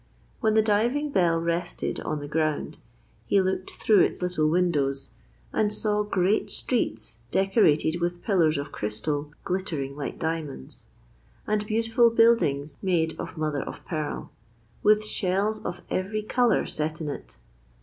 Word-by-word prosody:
When 220 -2 +2
the 220 - +5
diving 240 +8 +1
bell 175 -7 +3
rested 170 +1 -2
on 155 - -3
the 145 - -6
ground 155 0 -1 0.5
he 200 - +4
looked 190 0 -1
through 215 -3 +3
its - - +2
little 180 -4 +1
windows 150 -6 +1 0.4
and 210 -1 +2
saw 210 0 +1
great 200 0 +1
streets 110 - -1
decorated 175 - +3
with 175 0 -2
pillars 165 -7 +3
of 140 0 -4
crystal 145 +8 -3
glittering 160 -7 -2
like 145 -1 -5
diamonds, 160 - -4 0.6
and 210 0 0
beautiful 225 +2 +3
buildings 155 -12 +3
made 170 -4 +1
of - - -6
mother 155 -3 -1
of - - -8
pearl, 155 -3 -4 0.5
with 210 0 +4
shells 205 +2 0
of 175 0 -5
every 205 +3 -1
colour 240 +2 +2
set 155 +1 -2
in 160 - -4
it. 145 - -6
175 Hz, 140 wpm, -26 LUFS, 155-210 Hz, 0.6 s, the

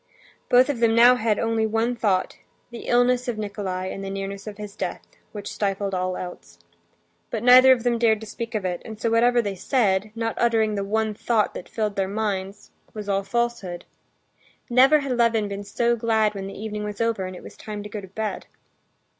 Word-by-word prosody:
Both 250 +1 +6
of 285 -5 -2
them 230 -1 +3
now 240 +2 +8
had 225 -4 0
only 225 -1 0
one 225 +3 0
thought—the 215 +3 -3
illness 245 +1 +2
of 240 -3 -2
Nikolay 195 -3 -4
and 195 - -7
the 195 - -4
nearness 195 +1 -5
of 205 -1 -7
his 210 -1 -8
death—which 205 -1 -7
stifled 200 -1 -2
all 185 0 -1
else. 130 - -9 0.7
But 215 - -3
neither 255 +1 +8
of 245 -3 +3
them 240 -1 +1
dared 220 -2 +3
to - - -7
speak 230 +2 -6
of 205 -3 -2
it, 180 -1 -2
and 220 -1 -9
so 230 -1 0
whatever 240 +1 +4
they 200 -2 -2
said—not 215 +1 0
uttering 225 -2 +2
the 200 -1 -2
one 220 +2 -1
thought 215 0 0
that - - -8
filled 210 -3 -2
their 195 -1 +1
minds—was 205 0 -5
all 195 -1 +1
falsehood. 200 -4 -2 0.9
Never 270 +5 +6
had 270 -3 -2
Levin 230 -3 +2
been 200 0 -5
so 235 +4 0
glad 220 -2 +1
when 195 -1 -6
the 195 - -9
evening 210 0 -4
was 210 -1 -6
over 230 -4 0
and 185 - -8
it - - -11
was - - -11
time 210 -1 -7
to 210 - -8
go 210 0 -6
to 190 - -10
bed. 215 +3 -4
215 Hz, 195 wpm, -24 LUFS, 200-235 Hz, 0.9 s, now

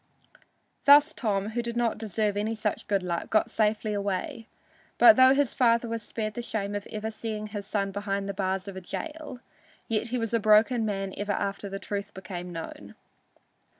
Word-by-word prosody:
Thus 290 +2 +7
Tom, 205 -5 -1
who 235 +2 -2
did 235 0 -4
not 230 -3 0
deserve 210 -1 -1
any 215 +2 -1
such 215 -1 -2
good 200 -2 +1
luck, 170 -2 -3
got 215 - +2
safely 215 0 +1
away, 205 - -3 0.5
but 335 - +9
though 260 +1 +7
his 285 -2 +1
father 235 -1 +3
was 230 0 -3
spared 215 0 -4
the 240 - -4
shame 205 -3 -3
of 205 -1 -4
ever 220 +1 -4
seeing 215 -1 -4
his 205 -1 -6
son 200 -2 -1
behind 200 0 -3
the 200 - -3
bars 190 0 -2
of 200 - -7
a 190 - -6
jail, 300 - -6 0.5
yet 225 +1 0
he 250 +2 -2
was 230 -1 -2
a 230 - +3
broken 220 +2 +4
man 195 -2 -3
ever 205 0 -1
after 200 0 -3
the 195 - -4
truth 200 0 -5
became 180 -2 -7
known. 165 -1 -8
215 Hz, 190 wpm, -27 LUFS, 200-230 Hz, 0.5 s, but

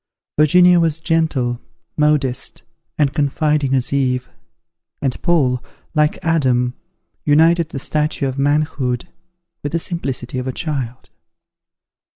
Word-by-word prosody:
Virginia 180 +4 +6
was 165 -2 +1
gentle, 150 -7 0 0.3
modest, 145 -4 0 0.3
and 145 -2 +2
confiding 145 -1 +1
as 130 +1 -1
Eve; 125 -2 0 0.7
and 135 -3 -2
Paul, 135 -8 +2 0.3
like 150 -1 +2
Adam, 130 -7 +2 0.5
united 160 +2 +4
the 140 - -6
stature 150 0 -1
of 135 +1 -4
manhood 140 -4 0 0.5
with 145 - -4
the - - +2
simplicity 135 -7 -4
of 125 - -4
a 130 - -2
child. 130 -6 -4
145 Hz, 115 wpm, -19 LUFS, 130-155 Hz, 0.7 s, Virginia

